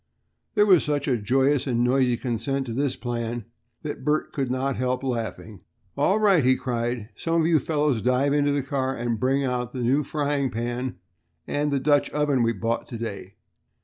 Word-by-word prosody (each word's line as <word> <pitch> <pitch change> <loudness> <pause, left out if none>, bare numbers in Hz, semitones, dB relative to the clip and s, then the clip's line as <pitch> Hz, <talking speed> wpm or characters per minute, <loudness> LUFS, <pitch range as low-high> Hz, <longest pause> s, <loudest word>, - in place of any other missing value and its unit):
There 210 - +5
was 185 -5 +5
such 145 -1 -1
a 130 - +3
joyous 135 +6 +1
and 120 -2 +1
noisy 125 -1 +2
consent 130 +3 -2
to 115 - -5
this 140 +2 0
plan 120 -1 -4 0.4
that 150 -1 -5
Bert 150 +1 0
could 135 -4 -1
not 130 +1 -1
help 125 +1 -1
laughing. 115 -5 -4 0.3
"All 190 +9 +2
right," 195 -8 +4
he 130 +1 +4
cried, 120 -3 -3
"some 165 0 0
of - - +1
you 165 -2 +4
fellows 145 -5 0
dive 125 +4 +2
into 145 0 +2
the 140 -1 0
car 135 -1 -1
and 120 -2 -2
bring 135 +3 +1
out 125 -2 -2
the 125 -2 -3
new 135 +5 +3
frying 145 -2 -1
pan 120 +2 -3 0.5
and 145 +1 -1
the 140 - +1
Dutch 145 +1 +2
oven 145 -3 +1
we 115 0 +3
bought 115 +2 -2
to 120 - -6
day. 100 -4 -6
130 Hz, 190 wpm, -25 LUFS, 120-145 Hz, 0.5 s, There